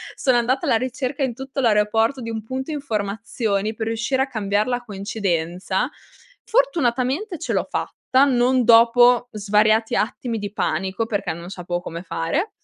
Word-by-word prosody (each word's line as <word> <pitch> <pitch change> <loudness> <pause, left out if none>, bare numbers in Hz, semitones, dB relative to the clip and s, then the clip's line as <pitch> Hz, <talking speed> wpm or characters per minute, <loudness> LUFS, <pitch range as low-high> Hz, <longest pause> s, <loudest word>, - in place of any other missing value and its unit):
Sono 255 -3 +2
andata 250 +3 +1
alla 225 - +3
ricerca 260 +3 -3
in 250 -4 0
tutto 270 +1 -6
l'aeroporto 225 +3 +2
di 230 0 -5
un 220 -1 -4
punto 260 +6 -5
informazioni 220 -4 -2
per 220 - -3
riuscire 235 +4 0
a - - -4
cambiare 210 -2 0
la 245 0 -1
coincidenza. 190 -2 -2 0.6
Fortunatamente 345 - 0
ce 335 - -3
l'ho - - 0
fatta - - -3 0.3
non 250 -1 +3
dopo 240 +1 +6
svariati 215 +2 +2
attimi 225 +1 -2
di 205 -1 -5
panico 195 +2 -1
perché 205 -6 -2
non 170 +2 -9
sapevo 175 -2 -4
come 170 -1 -6
fare. 190 - -2
230 Hz, 150 wpm, -22 LUFS, 205-260 Hz, 0.6 s, dopo